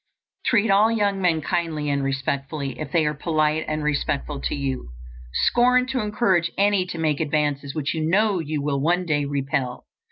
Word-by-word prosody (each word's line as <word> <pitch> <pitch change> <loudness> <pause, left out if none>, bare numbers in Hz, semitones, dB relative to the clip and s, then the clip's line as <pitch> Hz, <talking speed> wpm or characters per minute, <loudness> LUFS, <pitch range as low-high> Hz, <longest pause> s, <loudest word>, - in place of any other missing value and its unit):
Treat 220 -3 +3
all 210 +3 +5
young 205 -3 0
men 170 -3 +2
kindly 160 -2 -2
and 140 -1 0
respectfully, 135 0 -3
if 140 - -5
they 160 -1 +2
are 150 - +1
polite 155 +1 0
and 155 0 -2
respectful 145 -1 -1
to - - -2
you. 135 - -3 0.6
Scorn 250 +1 +4
to 255 0 -2
encourage 210 -5 +1
any 200 -2 +2
to 175 - -6
make 155 -3 0
advances 145 -3 -1
which 150 -2 -1
you 160 -1 -2
know 200 +1 +2
you 155 -2 -3
will 140 -1 0
one 175 +4 +1
day 145 -3 0
repel. 135 -3 -2
155 Hz, 180 wpm, -23 LUFS, 140-190 Hz, 0.6 s, all